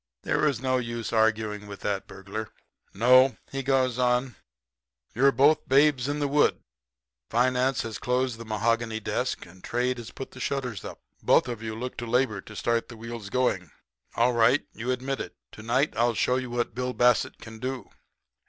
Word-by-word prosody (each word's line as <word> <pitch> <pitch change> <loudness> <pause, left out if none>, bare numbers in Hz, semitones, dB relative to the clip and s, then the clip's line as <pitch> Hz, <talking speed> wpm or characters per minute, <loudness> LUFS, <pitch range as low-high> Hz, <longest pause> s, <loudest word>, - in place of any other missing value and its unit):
There - - 0
was 145 -6 +2
no 130 0 +1
use 115 -1 -4
arguing 110 -2 +1
with 100 -1 -9
that 100 -1 -2
burglar. 100 +3 -6 0.4
"'No,' 130 +5 +5
he 135 - -2
goes 130 -2 +1
on; 125 0 +1 0.8
'you're 135 +4 +4
both 145 +3 +3
babes 140 -1 +4
in 145 +1 -1
the 145 -1 0
wood. 145 +1 +3 0.7
Finance 125 +2 +2
has 115 -2 -5
closed 125 -1 0
the - - -6
mahogany 115 +1 0
desk, 110 - -2
and 90 +1 -17
trade 125 +1 -1
has 115 -1 -8
put 135 - -8
the 130 - -12
shutters 125 -7 -3
up. - - -8 0.2
Both - - +4
of 120 -3 -5
you 110 -1 -4
look 125 +3 -5
to 120 - -5
labor 115 -4 +1
to 110 - -12
start 115 +2 0
the 120 - -10
wheels 115 -2 -7
going. 105 -8 0 0.5
All 120 +2 +3
right. 120 +4 +4
You 115 +3 -5
admit 130 +2 -1
it. - - -8 0.2
To - - -11
night 130 +6 +1
I'll 120 0 +2
show 125 +3 +2
you 130 -1 -4
what 120 -1 -2
Bill 125 +1 -2
Bassett 125 -1 +3
can 110 -1 -11
do.' 130 +1 -5
120 Hz, 185 wpm, -27 LUFS, 110-130 Hz, 0.8 s, No